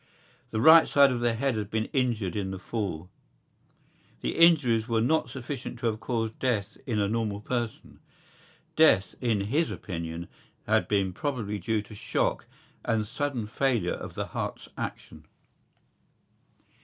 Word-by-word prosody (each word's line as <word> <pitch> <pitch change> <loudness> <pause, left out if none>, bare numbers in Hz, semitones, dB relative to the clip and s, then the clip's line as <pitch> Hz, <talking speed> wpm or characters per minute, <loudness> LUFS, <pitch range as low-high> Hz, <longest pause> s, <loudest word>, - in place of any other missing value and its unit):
The 110 - -2
right 160 +6 +8
side 140 -1 +5
of 125 - -1
the 120 -1 +1
head 135 +3 0
had 105 -2 -3
been 110 0 -1
injured 115 -9 0
in 100 -2 -2
the 95 - -4
fall. 95 -5 -4 1.1
The - - -2
injuries 140 -10 +5
were 115 -2 +1
not 125 +2 +2
sufficient 130 0 -6
to 120 - -6
have 110 -1 0
caused 115 -2 -2
death 110 -6 -1
in 115 -4 0
a 100 - +2
normal 105 -1 -1
person. 120 +1 -4 0.8
Death, 95 - +5
in 115 -5 +1
his 145 +11 +1
opinion, 85 -2 -5 0.4
had - - +2
been 100 -3 +1
probably 110 -5 -3
due 105 +3 -1
to 105 - -13
shock 105 - -1 0.4
and 110 -2 0
sudden 130 +1 -2
failure 115 -5 0
of - - -7
the - - -2
heart's - - -5
action. - - -7
115 Hz, 150 wpm, -28 LUFS, 105-125 Hz, 1.1 s, right